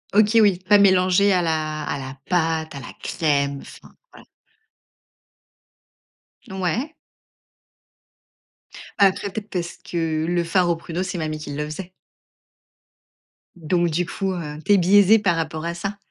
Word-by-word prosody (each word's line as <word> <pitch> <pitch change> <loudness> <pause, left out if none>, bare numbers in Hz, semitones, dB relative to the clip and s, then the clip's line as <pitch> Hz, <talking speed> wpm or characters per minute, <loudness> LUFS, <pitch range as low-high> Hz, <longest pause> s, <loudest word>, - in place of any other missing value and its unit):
OK 215 +2 +5
oui, 195 -4 +3
pas 205 0 +6
mélangé 190 +1 +4
à 180 -1 +2
la 155 -2 -2
à 140 - -3
la 130 +1 -8
pâte 160 -3 0
à 140 - -7
la 130 - -10
crème, 140 -3 0
enfin, - - -14 0.2
voilà. - - -16 2.2
Ouais. 190 - -3 2.1
Bah 200 - +7
après, 195 +1 0
peut-être 210 +1 -6
parce 175 -2 -4
que 160 -2 -2
le 175 0 0
far 175 +1 +1
aux 170 - +2
pruneaux, 170 +2 -5
c'est 180 -1 -4
mamie 155 -1 -3
qui 150 -1 -7
le 150 - -2
faisait 175 +4 -8 1.6
donc 175 +1 0
du 170 +2 -1
coup, 190 +1 -3
heu, 150 -4 -6
tu 205 - +4
es - - +6
biaisée 200 +4 +5
par 180 -5 +1
rapport 160 0 -3
à 170 - -2
ça. 195 +4 -5
175 Hz, 150 wpm, -22 LUFS, 160-195 Hz, 2.2 s, Bah